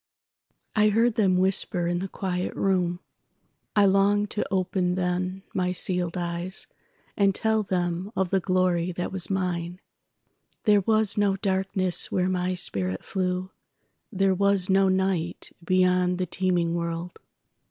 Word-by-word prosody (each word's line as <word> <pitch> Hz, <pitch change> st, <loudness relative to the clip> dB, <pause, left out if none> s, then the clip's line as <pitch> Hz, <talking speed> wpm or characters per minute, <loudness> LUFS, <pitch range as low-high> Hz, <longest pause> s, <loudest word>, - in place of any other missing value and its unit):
I 215 Hz, -1 st, +4 dB
heard 230 Hz, +3 st, +3 dB
them 195 Hz, -4 st, +2 dB
whisper 185 Hz, -1 st, +1 dB
in 175 Hz, 0 st, 0 dB
the 190 Hz, -, -3 dB
quiet 180 Hz, -1 st, -3 dB
room.I 185 Hz, +2 st, -2 dB
longed 200 Hz, +1 st, +3 dB
to 210 Hz, -, -1 dB
open 185 Hz, -1 st, 0 dB
then 185 Hz, +1 st, -2 dB
my 180 Hz, -1 st, 0 dB
sealèd 180 Hz, -1 st, -1 dB
eyes, 175 Hz, +1 st, -3 dB, 0.5 s
And 195 Hz, -1 st, +2 dB
tell 220 Hz, 0 st, +1 dB
them 180 Hz, 0 st, -2 dB
of 190 Hz, -2 st, -1 dB
the 195 Hz, -, +3 dB
glory 185 Hz, -1 st, +1 dB
that 175 Hz, +1 st, -4 dB
was 190 Hz, -2 st, +1 dB
mine. 180 Hz, -2 st, -2 dB, 0.8 s
There 205 Hz, -2 st, +4 dB
was 215 Hz, 0 st, +1 dB
no 200 Hz, -1 st, +2 dB
darkness 190 Hz, -2 st, -1 dB
where 185 Hz, 0 st, +1 dB
my 185 Hz, 0 st, -1 dB
spirit 95 Hz, -, -2 dB
flew, 185 Hz, 0 st, -2 dB, 0.6 s
There 195 Hz, -2 st, +2 dB
was 200 Hz, -1 st, +1 dB
no 195 Hz, 0 st, +4 dB
night 185 Hz, -3 st, -1 dB
beyond 180 Hz, 0 st, +2 dB
the 185 Hz, -, -1 dB
teeming 180 Hz, -2 st, 0 dB
world. 170 Hz, +1 st, -4 dB
185 Hz, 135 wpm, -26 LUFS, 180-195 Hz, 0.8 s, I